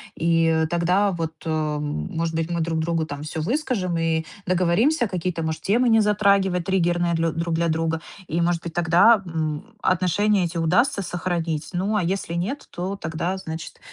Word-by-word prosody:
и, 165 0 +2
э, 160 -1 +2
тогда 180 +4 +2
вот, 165 -2 -3
э, 160 - -2
м, 150 -1 -2
может 165 0 -1
быть, 165 +1 -1
мы 170 -1 0
друг 160 0 -1
другу 165 0 0
там 145 -1 -7
всё 155 +1 -4
выскажем 205 - -1
и 165 -1 0 0.2
договоримся 185 - +2
какие-то, 180 -3 -3
может, 160 0 -3
темы 240 +5 +2
не 225 -1 +5
затрагивать 200 -4 +2
триггерные 175 -2 +1
длё 165 0 +1
друг 165 +1 -2
для 170 +1 +1
друга, 160 0 -1 0.3
и, 165 +3 -1
может 170 0 0
быть, 170 - -6
тогда, 175 +6 +5
м, 160 +5 -4
отношения 185 +3 +2
эти 170 0 -4
удастся 200 - +2
сохранить. 170 -3 -2
Ну 195 +4 0
а 205 - +1
если 180 -1 -2
нет, 195 +12 -3
то 185 +3 -3
тогда, 170 +3 -3
значит, 160 -3 -7
170 Hz, 180 wpm, -23 LUFS, 160-190 Hz, 0.3 s, не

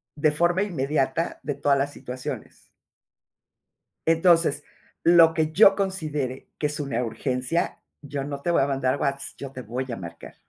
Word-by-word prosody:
de 150 0 +2
forma 175 +5 +2
inmediata, 150 -3 -1
de 145 - -3
todas 140 -1 +2
las 140 +1 0
situaciones". 125 -2 -7 1.5
"entonces, 165 -3 +3 0.4
lo 165 -1 +7
que 155 -1 0
yo 195 +2 +7
considere 155 -9 -3
que 150 - 0
es 150 +1 -3
una 135 -4 -1
urgencia, 125 +7 -2 0.2
yo 140 -1 -4
no 140 -1 -5
te 175 - 0
voy 170 - +3
a - - +2
mandar 135 -1 0
Whats, 140 0 -2
yo 140 -1 -8
te 130 -1 -7
voy 125 +4 -4
a - - -3
marcar". 85 -3 -9
145 Hz, 160 wpm, -25 LUFS, 130-165 Hz, 1.5 s, lo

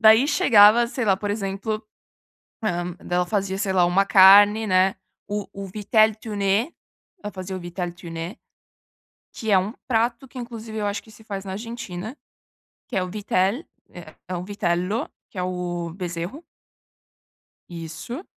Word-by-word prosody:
Daí 220 +4 +7
chegava 235 -5 +6
sei 250 +1 -3
lá, 195 -3 +3
por 205 +1 -3
exemplo, 205 +1 -3 0.9
hum, 175 0 -3
daí 175 - -3
ela 180 0 +2
fazia 195 -1 -1
sei 195 -1 0
lá, 180 -2 +4
uma 180 +3 +3
carne, 205 +3 +7
né 185 -1 +3 0.3
o 205 -1 -3
o 200 0 -6
vitele 215 +2 +3
tune 210 - -1 0.5
ela 210 - -5
fazia 185 0 -6
o - - -6
vitele 175 0 -4
tune 170 +2 -7 1.0
que 220 -2 -3
é 195 - +7
um 195 +4 -3
prato 235 +2 0
que 260 - -13
inclusive 230 -2 -7
eu 210 -1 -1
acho 205 0 -3
que 220 - -17
se 215 +1 -16
faz 200 -2 -6
na 190 - -5
Argentina, 220 0 -6 0.7
que - - -5
é 190 - +2
o 185 - -3
vitele 205 - 0 0.2
é, - - -12
é 185 - -3
o 175 - -4
vitelo 185 +1 -1 0.2
que 195 - -11
é 180 - 0
o 175 -2 -3
bezerro 180 - -5 1.3
Isso. 170 - -7
200 Hz, 165 wpm, -23 LUFS, 180-220 Hz, 1.3 s, Daí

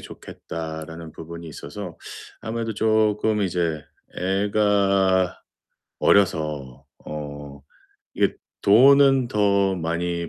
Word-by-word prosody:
좋겠다."라는 80 0 -8
부분이 85 +1 -9
있어서 85 +4 -8 0.4
아무래도 115 0 -4
쪼끔 110 0 +1
이제 85 -5 -1 0.3
애가 95 -1 +1 0.6
어려서 75 -9 +1 0.2
어 75 -2 -8 0.5
이게 - - +1 0.3
돈은 135 +4 +6
더 100 -2 +2
많이 85 0 -2
95 Hz, 185 characters per minute, -23 LUFS, 80-105 Hz, 0.6 s, 돈은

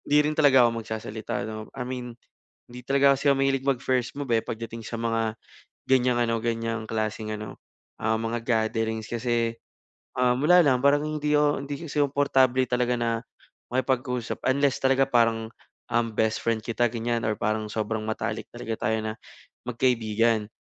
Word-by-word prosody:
hindi 145 - +5
rin 150 - +1
talaga 135 -5 +6
ako 115 -1 +1
magsasalita 110 +2 -5
'no. 110 0 -6
I 125 - -3
mean 125 -2 -6 0.5
hindi 125 +1 -9
talaga 140 +1 +4
kasi 140 - -8
ako 140 -1 +4
mahilig 135 -1 +1
mag-first 125 -2 0
move, 140 -2 -5
eh, 115 - +4
pagdating 115 0 -6
sa - - -5
mga 115 -1 0 0.5
ganyang 125 -2 +3
ano, 115 -1 +1
ganyang 115 -1 -2
klaseng 110 0 -2
ano, 105 -1 -6 0.5
ah, 110 0 +1
mga 115 +1 -3
gatherings 110 -1 0
kasi, 115 -1 -1 0.6
um, 125 0 +2
wala 175 +4 +6
lang 130 -4 +3
parang, 140 +2 +3
hindi 150 -1 0
ako 145 0 +3
hindi 145 - -3
kasi 150 - -2
komportable 135 -2 +3
talaga 125 0 +1
na 120 -1 0 0.6
makipag-usap 125 -1 -1
unless 140 +1 +2
talaga 135 0 +3
parang, 115 -2 +2 0.4
um, 120 0 +2
best 110 0 +1
friend 115 -2 -1
kita, 120 +1 +1
ganyan 115 0 -2
or 110 - 0
parang 110 +1 -1
sobrang 110 +1 -2
matalik 110 - -3
talaga 110 -2 -4
tayo 110 0 +1
na 110 0 -3 0.5
magkaibigan. 115 -3 +1
120 Hz, 165 wpm, -26 LUFS, 110-130 Hz, 0.6 s, talaga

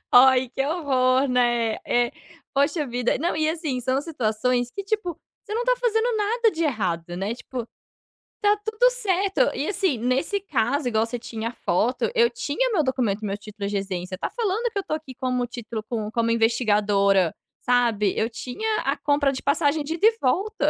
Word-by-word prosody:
Ai, 260 0 +7
que 270 - -2
horror, 270 -4 +2
né, 240 -3 +1
é. 240 0 +2 0.4
Poxa 285 +2 +1
vida. 245 -1 0
Não, 335 +4 -1
e 310 0 +1
assim, 310 -7 -2
são 260 +2 +1
situações 245 -4 -1
que, 400 - -6
tipo, 390 -5 -2 0.2
você 425 - -5
não 475 - 0
tá - - +3
fazendo 470 -1 +1
nada 445 +2 +2
de 335 -2 -2
errado, 175 - -2
né, 200 +4 -2
tipo, 240 0 -6 0.7
tá 415 0 +4
tudo 440 +3 +3
certo. 400 -6 0
E, 290 - -2
assim, 380 - +1
nesse 265 - 0
caso, 280 - 0
igual 220 -1 +2
você 240 +1 -5
tinha 230 0 -5
foto, 245 - 0
eu 470 0 +4
tinha - - -1
meu 355 -8 +2
documento, 240 -6 -1
meu 200 0 -2
título 205 -1 -6
de 205 - -3
residência. 185 -2 -3
Está - - -4
falando 460 +1 -1
que 405 - -2
eu - - -4
tô 310 - -2
aqui 300 -4 -8
como 250 -1 -1
título 230 -2 -6
com 215 -3 -3
como 230 0 0
investigadora, 205 -5 +3 0.3
sabe. 235 -5 +2
Eu 220 - +1
tinha 345 - -3
a - - -1
compra 285 -1 +2
de 260 - -6
passagem 290 +1 +2
de 305 +3 -3
ida 405 +5 +4
e 450 0 +2
volta. 390 +12 +1
255 Hz, 185 wpm, -24 LUFS, 230-365 Hz, 0.7 s, Ai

